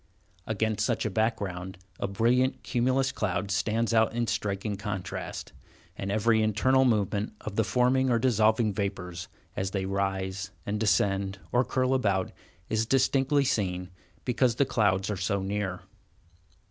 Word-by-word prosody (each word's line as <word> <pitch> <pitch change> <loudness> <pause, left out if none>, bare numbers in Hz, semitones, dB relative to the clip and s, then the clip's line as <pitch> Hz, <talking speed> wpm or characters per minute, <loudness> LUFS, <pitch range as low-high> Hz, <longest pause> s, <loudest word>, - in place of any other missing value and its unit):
Against 110 -1 0
such - - 0
a 110 - -1
background, 95 -4 -2 0.2
the - - -1
brilliant 120 +6 +1
cumulus 130 +2 +1
clouds 100 -1 -1
stand 115 +3 0
out 110 0 +3
in 120 0 +1
striking 105 -1 -2
contrast, 95 -4 -5 0.4
and 100 0 -4
every 110 +2 +3
internal 130 +5 +3
movement 105 -3 +1
of 105 - -6
the 110 - +3
forming 130 +3 +2
or 120 - +3
dissolving 110 -2 +3
vapors, 90 -4 -4 0.3
as 95 0 -1
they 95 -1 -2
rise, 95 -1 -2 0.2
and 105 +1 -2
descend, 100 -2 +1
or 125 +1 +3
curl 130 0 0
about, 100 -7 +1 0.4
is 110 0 0
distinctly 135 +2 +3
seen, 90 -6 -1 0.3
because 125 -1 +2
the 140 - +3
clouds 100 -5 +1
are 105 - -2
so 95 +1 -1
near. 95 -2 -2
105 Hz, 145 wpm, -28 LUFS, 95-120 Hz, 0.4 s, out